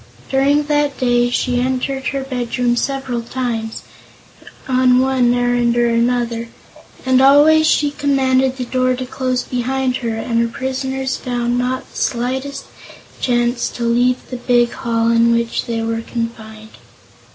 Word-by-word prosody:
During 280 +2 +3
that 290 -1 0
day 245 -1 +2
she 245 0 0
entered 260 +1 -2
her 275 -1 -2
bedroom 245 -2 -1
several 260 -2 -2
times, 230 -2 -4 0.8
on 255 -1 +3
one 260 -2 +2
errand 245 -1 +1
or 240 0 +3
another, 235 0 0 0.6
but 260 0 +4
always 300 +3 +6
she 290 -2 +2
commanded 265 -2 +1
the 250 - -3
door 255 0 +1
to 255 +1 -5
close 255 -1 -2
behind 255 +1 -1
her 230 -3 -3
and 230 +1 -1
her 235 - +1
prisoners 265 +1 -3
found 245 -1 -2
not 255 +1 -2
the - - -12
slightest 265 +3 -2 0.5
chance 240 -1 0
to 240 - -6
leave 245 +2 +1
the 250 - -4
big 240 -1 +2
hall 230 -1 0
in 230 0 +4
which 235 0 -2
they 230 -1 -2
were 225 0 -2
confined. 220 -2 -7
250 Hz, 145 wpm, -18 LUFS, 235-265 Hz, 0.8 s, always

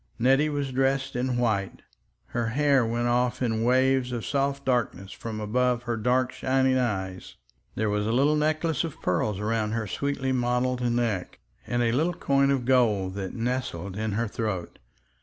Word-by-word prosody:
Nettie 135 +5 +3
was 145 -2 -2
dressed 135 0 0
in 125 0 0
white, 110 -5 -1 0.5
her 120 -1 -1
hair 140 +2 +3
went 120 +1 -1
off 125 +1 +1
in 115 -3 0
waves 130 +1 +3
of 120 -3 -3
soft 140 0 -1
darkness 115 -7 -1
from 110 -2 -6
above 120 +3 0
her 120 -1 -2
dark 125 +3 +1
shining 130 0 +1
eyes; 95 -6 -3 0.4
there 110 - 0
was 105 0 0
a - - +1
little 140 +5 +3
necklace 155 0 0
of 165 -3 -6
pearls 90 +3 0
about 110 +1 -1
her 115 -1 -1
sweetly 135 +5 -2
modeled 125 0 0
neck, 120 -6 -1 0.3
and 120 0 0
a 115 - +2
little 160 +8 +1
coin 140 0 +2
of 135 -3 +1
gold 110 -7 +2
that 95 -1 -5
nestled 115 -7 -3
in 110 0 -2
her 115 +3 0
throat. 105 -5 -4
120 Hz, 170 wpm, -26 LUFS, 110-130 Hz, 0.5 s, Nettie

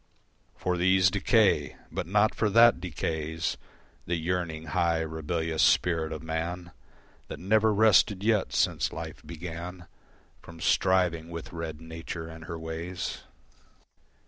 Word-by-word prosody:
For 90 -1 -1
these 95 +1 +4
decay: 105 +1 +2 0.2
but - - -4
not 105 +4 +3
for 110 - 0
that 115 +3 +6
decays 80 -1 -3 0.5
The 85 - 0
yearning, 85 -1 -2
high, 85 -1 +2
rebellious 80 0 -2
spirit 80 -1 +3
of 80 -1 -6
man 85 +2 -4 0.6
That - - -7
never 110 +3 +3
rested 105 -2 +4
yet 110 -2 +2
since - - +1
life 80 +1 -7
began 85 +2 -7 0.6
From 85 -1 -13
striving 90 -3 +2
with 85 -1 -7
red 80 -2 -5
Nature 80 0 -7
and 80 0 -10
her 85 - -5
ways. 80 +2 -5
85 Hz, 125 wpm, -28 LUFS, 80-95 Hz, 0.6 s, that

